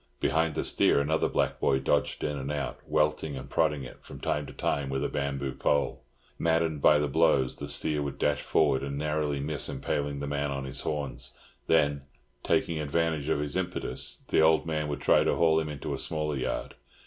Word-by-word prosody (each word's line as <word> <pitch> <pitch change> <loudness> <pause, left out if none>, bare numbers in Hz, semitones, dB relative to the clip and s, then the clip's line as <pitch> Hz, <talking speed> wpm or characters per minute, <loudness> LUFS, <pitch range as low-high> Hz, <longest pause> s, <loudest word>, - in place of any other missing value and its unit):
Behind 80 -1 +1
the - - -1
steer - - +3
another 80 +3 +1
black - - 0
boy 65 - +3
dodged 70 +2 0
in 75 - -1
and 70 0 -4
out, 75 -2 -3
welting 75 -1 +1
and - - -7
prodding 70 -2 +1
it 60 - -11
from - - -10
time 75 -1 -1
to - - -8
time 70 -1 -1
with 65 +1 -1
a - - +1
bamboo 70 -1 -2
pole. 70 +1 0 0.4
Maddened 80 -2 +1
by 75 - +6
the 75 0 +1
blows, 65 -1 +2
the 70 - -5
steer 75 +1 +1
would 70 -1 -4
dash 75 0 +1
forward 70 -4 +2
and 70 0 -4
narrowly 75 -1 -1
miss 75 0 -2
impaling 70 -1 -2
the 70 - -3
man 70 0 -1
on 70 -1 -3
his 65 - -4
horns; 75 -3 -4 0.3
then, 70 -3 +3 0.4
taking 80 -2 +1
advantage 75 0 0
of 70 - +1
his 75 -1 -3
impetus, 90 -1 -3
the - - +4
old 80 0 +4
man 75 -2 -1
would 70 -1 -4
try - - +4
to - - +1
haul 80 -1 +4
him 80 -1 -3
into 75 -2 -4
a - - -4
smaller 75 -2 -2
yard. 65 - -3
75 Hz, 205 wpm, -28 LUFS, 70-75 Hz, 0.4 s, by